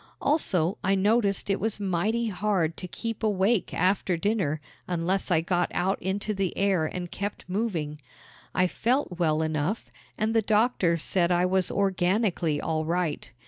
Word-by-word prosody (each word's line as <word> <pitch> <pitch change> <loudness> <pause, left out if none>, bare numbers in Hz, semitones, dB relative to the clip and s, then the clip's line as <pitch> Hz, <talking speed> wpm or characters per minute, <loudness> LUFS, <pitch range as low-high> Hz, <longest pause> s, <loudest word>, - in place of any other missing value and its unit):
Also, 195 - +1
I 195 +1 +3
noticed 205 +1 +2
it 195 0 +1
was 220 -1 -1
mighty 205 +5 0
hard 185 -5 0
to 180 - -6
keep 225 +4 -5
awake 210 0 +1
after 185 -1 +1
dinner 180 -6 0 0.3
unless 180 +3 -1
I 165 -3 +3
got 175 +1 0
out 190 +2 0
into 200 +3 -2
the 195 -3 -2
air 190 -5 +2
and 175 +1 -5
kept 200 +1 -5
moving. 180 -7 -2 0.5
I 185 - +4
felt 230 -1 0
well 160 -2 +2
enough 155 +7 -2 0.3
and 220 +1 0
the 225 - +4
doctors 210 -6 +2
said 175 -2 +1
I 175 0 +3
was 185 -1 +2
organically 185 -4 +1
all 160 -1 -1
right. 165 -6 -2
190 Hz, 155 wpm, -27 LUFS, 170-210 Hz, 0.5 s, I